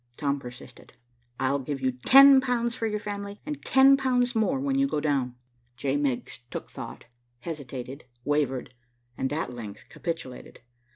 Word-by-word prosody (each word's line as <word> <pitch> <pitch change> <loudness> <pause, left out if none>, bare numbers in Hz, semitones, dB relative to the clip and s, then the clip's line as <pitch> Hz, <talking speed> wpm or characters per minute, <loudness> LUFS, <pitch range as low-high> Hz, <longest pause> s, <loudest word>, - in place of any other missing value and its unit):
Tom 140 -1 0
persisted. 125 0 -12 0.5
"I'll 135 +2 +1
give 135 +1 -4
you 130 -1 +1
ten 270 - +8
pounds 240 -2 0
for 225 -2 -2
your 210 -1 -1
family, 205 -1 -5
and 295 -1 -5
ten 270 +1 +6
pounds 250 -2 +1
more 230 +4 +1
when 275 0 0
you 275 - +3
go 150 - -1
down." 135 -5 0 0.4
J. 135 0 -1
Miggs 140 -6 -2
took - - -7
thought, - - -8 0.4
hesitated, 140 -3 -7 0.2
wavered, 135 -4 0 0.4
and 130 +3 -2
at 150 -4 -2
length 110 -4 -8
capitulated. 165 -7 -6
150 Hz, 155 wpm, -27 LUFS, -, 0.5 s, ten